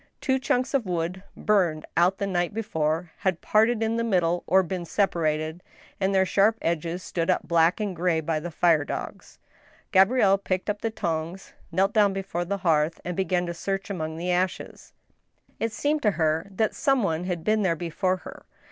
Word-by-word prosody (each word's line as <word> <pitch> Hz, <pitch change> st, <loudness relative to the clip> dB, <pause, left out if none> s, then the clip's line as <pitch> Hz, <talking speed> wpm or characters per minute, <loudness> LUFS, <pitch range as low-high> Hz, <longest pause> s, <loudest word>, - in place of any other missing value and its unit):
Two 265 Hz, 0 st, +1 dB
chunks 255 Hz, +1 st, 0 dB
of 255 Hz, -7 st, +1 dB
wood, 175 Hz, +1 st, -2 dB, 0.2 s
burned 180 Hz, -7 st, +1 dB
out 180 Hz, +3 st, +3 dB
the 200 Hz, -, -2 dB
night 175 Hz, 0 st, -1 dB
before, 160 Hz, -5 st, -1 dB
had 185 Hz, -3 st, 0 dB
parted 220 Hz, +1 st, +2 dB
in 225 Hz, +1 st, 0 dB
the 230 Hz, -, 0 dB
mid^ 195 Hz, -6 st, +2 dB
die 170 Hz, +1 st, 0 dB
or 190 Hz, +1 st, +4 dB
been 180 Hz, 0 st, -4 dB
separated, 160 Hz, -3 st, -1 dB, 0.4 s
and 195 Hz, 0 st, +1 dB
their 190 Hz, -1 st, +3 dB
sharp 205 Hz, +4 st, +3 dB
ends 170 Hz, +2 st, -2 dB
stood 170 Hz, 0 st, -2 dB
up 185 Hz, -, +1 dB
black 170 Hz, +2 st, +3 dB
and 205 Hz, -3 st, -2 dB
gray 170 Hz, -1 st, +1 dB
by 160 Hz, 0 st, -1 dB
the 175 Hz, +3 st, -5 dB
fire 165 Hz, -2 st, +3 dB
dogs. -, -, -7 dB, 0.5 s
Gabrielle 195 Hz, 0 st, +4 dB
picked 190 Hz, +1 st, -1 dB
up 205 Hz, -, -8 dB
the 225 Hz, -, 0 dB
tongs, 170 Hz, -2 st, -4 dB, 0.2 s
knelt 195 Hz, +4 st, +1 dB
down 205 Hz, -3 st, +4 dB
before 190 Hz, -3 st, -3 dB
the 200 Hz, +3 st, -2 dB
hearth, 155 Hz, 0 st, +2 dB
and 180 Hz, 0 st, -3 dB
began 180 Hz, -1 st, 0 dB
to 170 Hz, -, -4 dB
search 195 Hz, +3 st, -3 dB
among 160 Hz, -4 st, -4 dB
the 180 Hz, +2 st, -2 dB
ashes. 180 Hz, +1 st, -2 dB, 0.7 s
It 225 Hz, -, -1 dB
seemed 295 Hz, +6 st, 0 dB
to 210 Hz, -, +3 dB
her 160 Hz, +1 st, +1 dB
that 205 Hz, +2 st, 0 dB
some 270 Hz, -5 st, +1 dB
one 165 Hz, -2 st, -1 dB
had 175 Hz, -3 st, -3 dB
been 215 Hz, +2 st, +2 dB
there 185 Hz, -4 st, +2 dB
before 180 Hz, +3 st, -1 dB
her. -, -, -11 dB
185 Hz, 190 wpm, -25 LUFS, 165-200 Hz, 0.7 s, or